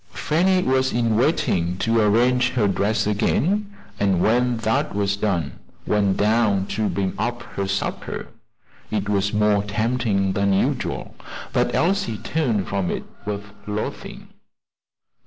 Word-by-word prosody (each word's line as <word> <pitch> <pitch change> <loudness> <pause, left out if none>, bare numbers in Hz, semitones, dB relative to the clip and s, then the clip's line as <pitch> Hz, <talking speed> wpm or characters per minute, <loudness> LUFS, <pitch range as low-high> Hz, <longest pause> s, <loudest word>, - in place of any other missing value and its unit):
Fanny 185 +4 +2
was 130 0 +2
in 115 -2 +1
waiting 110 - +1
to 115 +3 +2
arrange 125 +4 +3
her 115 -5 +2
dress 100 +2 +1
again, 190 - +1 0.3
and 95 -3 +2
when 120 +4 +2
that 115 -2 0
was 100 0 +1
done, 90 -10 -2 0.3
went 100 -2 +1
down 105 -2 +2
to 105 +1 -1
bring 95 +1 -1
up 120 0 -2
her 100 -1 -2
supper. 100 0 -3 0.6
It 105 -2 -2
was 100 0 +1
more 105 -1 +3
tempting 105 -2 0
than 100 0 +1
usual, 95 - -1 0.4
but - - +1
Elsie 190 - +1
turned 115 - -1
from 95 -3 -1
it - - -3 0.2
with 100 -1 -3 0.2
loathing. 105 +1 -5
105 Hz, 135 wpm, -22 LUFS, 100-120 Hz, 0.6 s, arrange